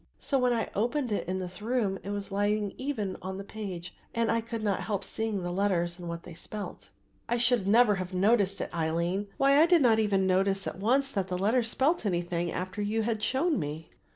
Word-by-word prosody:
So, 275 - 0
when 250 -1 +3
I 230 -2 -1
opened 245 +4 0
it 205 - -1
in 185 +1 -1
this 185 +2 -5
room, 215 -4 0
it 200 - -7
was 205 -1 -4
lying 205 0 0
even 240 -9 -3
on 190 +1 -5
the 195 - -5
page 190 -5 -6 0.2
and 230 -1 +2
I 230 0 +1
could 230 -1 -5
not 200 -3 0
help 200 -3 -2
seeing 220 -3 -3
the 175 - -2
letters 175 -2 0
and 175 -1 -6
what 170 0 -5
they 175 - -10
spelt." 205 +5 -8 0.4
"I 240 - +2
should 240 -4 +2
never 225 +1 +6
have 185 0 -4
noticed 200 +1 +2
it, - - -4
Aline; 170 +4 -1
why 275 +2 +5
I 325 - +6
did 340 -4 +5
not 225 -3 +5
even 200 -3 +2
notice 195 +1 +2
at - - -5
once 270 +7 +2
that 195 -5 -1
the 180 -1 -2
letters 225 +5 +2
spelt 295 +8 +1
anything 175 -3 -1
after 185 +3 -4
you 215 +2 0
had 220 -1 -1
shown 285 - +1
me." 155 +1 -5
205 Hz, 220 wpm, -29 LUFS, 185-230 Hz, 0.4 s, never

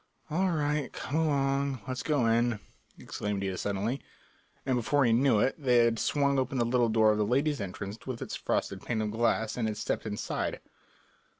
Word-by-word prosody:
"All 185 +4 +2
right, 150 -3 0
come 130 - -5
along, 140 -4 +1
let's 130 0 -3
go 145 -6 +1
in," 115 0 +2 0.4
exclaimed 105 -1 -4
Ida 95 -1 -2
suddenly, 100 +8 -2 0.6
and 130 -1 +1
before 135 +4 +2
he 115 - +4
knew 125 -1 +4
it 130 - +2
they 125 -4 +3
had 115 -1 +1
swung 140 -2 +2
open 130 +1 -1
the 120 - +2
little 120 0 +2
door 110 -1 +4
of 105 - 0
the - - +3
ladies' 140 +4 +1
entrance 100 +4 -6
with 125 -3 -4
its - - -5
frosted - - -2
pane 110 -3 -2
of 105 - -2
glass 115 -1 +1
and 115 -2 0
had 105 -1 -3
stepped 110 - -2
inside. 105 -1 -3
120 Hz, 190 wpm, -29 LUFS, 110-140 Hz, 0.6 s, he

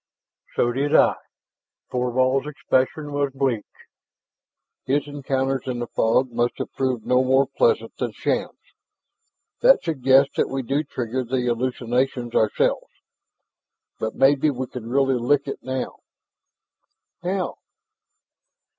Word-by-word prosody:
"So 120 - +2
did 140 +4 0
I." - - +6 0.8
Thorvald's 130 +2 +1
expression 145 0 -1
was 145 -1 0
bleak; 130 -6 0 1.2
his 140 +2 +1
encounters 135 -2 -2
in 125 -1 -2
the 120 - -3
fog 120 +3 +1
must 120 +1 0
have - - -5
proved 130 -4 -1
no 125 +1 +3
more 130 +1 +4
pleasant 480 -2 +1
than - - -2
Shann's. - - -3 0.9
"That - - +6
suggests 135 -2 +3
that - - +1
we 135 0 -3
do 140 +5 0
trigger 130 -2 -3
the 125 +1 -1
hallucinations 125 0 -1
ourselves. 110 - +1 1.1
But 110 0 -3
maybe 135 +3 +4
we 130 -2 -3
can 120 -2 -8
really 135 0 +2
lick 140 +4 +1
it 140 - -4
now." 130 0 -4 1.2
"How?" 185 0 -2
130 Hz, 120 wpm, -23 LUFS, 125-140 Hz, 1.2 s, I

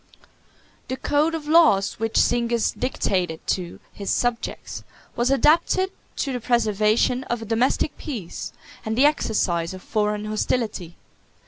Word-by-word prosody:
—M.] - - -27 0.6
The 260 - -3
code 295 +4 +1
of 305 -2 -6
laws 300 -14 +4
which 225 0 -2
Zingis 235 -1 +2
dictated 180 -9 -1
to 175 -2 -2
his 200 -1 -6
subjects 245 -1 -2 0.3
was 240 +2 +1
adapted 325 +7 +3 0.2
to 275 - -2
the 250 - -2
preservation 225 +1 +2
of 240 -1 -3
a - - -7
domestic 245 +7 +1
peace, 220 - -6 0.3
and 220 +1 -3
the 270 - +5
exercise 190 - +1
of 185 - -11
foreign 210 0 -1
hostility. 215 -5 -2
230 Hz, 135 wpm, -23 LUFS, 210-260 Hz, 0.6 s, the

